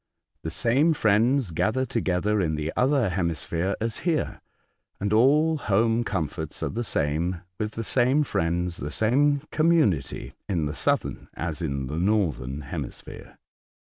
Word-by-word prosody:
The 80 Hz, -, -4 dB
same 135 Hz, -, +2 dB
friends 115 Hz, 0 st, +2 dB
gather 110 Hz, +10 st, 0 dB
together 100 Hz, -1 st, 0 dB
in 80 Hz, -4 st, 0 dB
the 75 Hz, +1 st, -3 dB
other 130 Hz, -4 st, +2 dB
hemisphere 85 Hz, +1 st, -1 dB
as 115 Hz, 0 st, -2 dB
here, 165 Hz, -3 st, -1 dB, 0.6 s
and 100 Hz, +1 st, -1 dB
all 150 Hz, +7 st, +4 dB
home 115 Hz, +1 st, +2 dB
comforts 90 Hz, -, -3 dB
are -, -, 0 dB
the 120 Hz, +3 st, -3 dB
same, 85 Hz, -1 st, -1 dB, 0.2 s
with 110 Hz, 0 st, -2 dB
the 115 Hz, -, -4 dB
same 130 Hz, +6 st, +2 dB
friends, 85 Hz, -, -1 dB
the 75 Hz, -, -4 dB
same 140 Hz, -, +2 dB
community 135 Hz, -, +1 dB, 0.2 s
in 85 Hz, -6 st, 0 dB
the 75 Hz, -, -3 dB
southern -, -, 0 dB
as 80 Hz, -1 st, -3 dB
in 70 Hz, -4 st, -2 dB
the 75 Hz, +5 st, -4 dB
northern 80 Hz, -, 0 dB
hemisphere. 70 Hz, -, -7 dB
100 Hz, 145 wpm, -26 LUFS, 80-125 Hz, 0.6 s, all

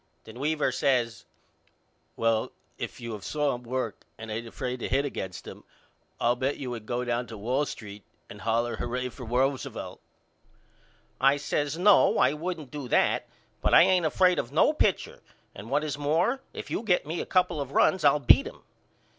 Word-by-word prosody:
Then 110 Hz, +2 st, -12 dB
Weaver 150 Hz, -1 st, 0 dB
says 125 Hz, -3 st, 0 dB, 0.9 s
Well 115 Hz, -1 st, +1 dB, 0.3 s
if -, -, -6 dB
you 115 Hz, -2 st, -6 dB
have 105 Hz, -2 st, -8 dB
saw 150 Hz, +3 st, 0 dB
him 120 Hz, -, -6 dB
work 125 Hz, -2 st, -4 dB, 0.2 s
and 110 Hz, 0 st, -8 dB
ain't 115 Hz, +2 st, -4 dB
afraid 125 Hz, +2 st, -4 dB
to -, -, -4 dB
hit 140 Hz, +2 st, +1 dB
against 95 Hz, -9 st, -5 dB
him -, -, -10 dB, 0.6 s
I'll 120 Hz, +1 st, +2 dB
bet 130 Hz, +3 st, -1 dB
you 130 Hz, -3 st, -5 dB
would 115 Hz, -3 st, -7 dB
go 125 Hz, +1 st, -2 dB
down 120 Hz, 0 st, -1 dB
to 110 Hz, -, -8 dB
Wall 130 Hz, +8 st, 0 dB
Street 105 Hz, -1 st, -8 dB, 0.3 s
and -, -, -11 dB
holler 115 Hz, +1 st, 0 dB
Hurrah 125 Hz, +1 st, -3 dB
for 125 Hz, -2 st, -10 dB
Roosevelt. 130 Hz, +3 st, -2 dB, 1.2 s
I 135 Hz, +2 st, +4 dB
says 145 Hz, +1 st, -2 dB
No 195 Hz, +3 st, +5 dB
I -, -, +4 dB
wouldn't 155 Hz, -3 st, -5 dB
do 145 Hz, -3 st, -6 dB
that -, -, +2 dB, 0.3 s
but -, -, +3 dB
I -, -, +9 dB
ain't 180 Hz, -3 st, +3 dB
afraid 180 Hz, +2 st, +3 dB
of 120 Hz, -, -4 dB
no 165 Hz, -, +4 dB
pitcher 210 Hz, -, 0 dB, 0.3 s
and 100 Hz, +4 st, -10 dB
what 145 Hz, +3 st, +1 dB
is 145 Hz, -2 st, -4 dB
more 170 Hz, -, +1 dB
if -, -, -8 dB
you -, -, -1 dB
get 190 Hz, -9 st, +1 dB
me 160 Hz, +3 st, -3 dB
a -, -, -4 dB
couple 180 Hz, -4 st, +1 dB
of 135 Hz, -1 st, -5 dB
runs 185 Hz, -4 st, +3 dB
I'll 145 Hz, 0 st, +5 dB
beat 140 Hz, -, +5 dB
him. -, -, -12 dB
130 Hz, 190 wpm, -27 LUFS, 120-150 Hz, 1.2 s, I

